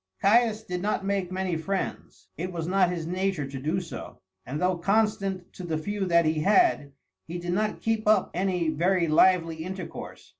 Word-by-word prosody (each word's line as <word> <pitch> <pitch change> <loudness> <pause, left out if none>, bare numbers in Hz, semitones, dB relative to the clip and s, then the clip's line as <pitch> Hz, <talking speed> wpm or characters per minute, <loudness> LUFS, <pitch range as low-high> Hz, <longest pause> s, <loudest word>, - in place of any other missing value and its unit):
Caius 220 +1 +3
did 180 -3 -4
not 205 0 -1
make 195 -2 -1
many 185 -2 -1
friends. 190 +4 -4
It 180 +3 -4
was 165 -2 -4
not 185 -1 +3
his 170 -3 -3
nature 185 -3 -1
to 135 0 -6
do 155 +7 -1
so, 175 -3 -8 0.3
and 145 +4 -3
though 180 -1 +1
constant 195 -2 0
to 185 - -9
the 165 -3 -2
few 205 +5 -2
that 170 -1 +4
he 155 0 +1
had, 195 - +3 0.3
he 170 +2 -5
did 175 0 -3
not 215 +3 -1
keep 225 -1 -1
up 210 -3 +4
any 180 -2 0
very 170 +3 +1
lively 165 0 +4
intercourse. 180 +2 -7
180 Hz, 185 wpm, -27 LUFS, 165-195 Hz, 0.3 s, that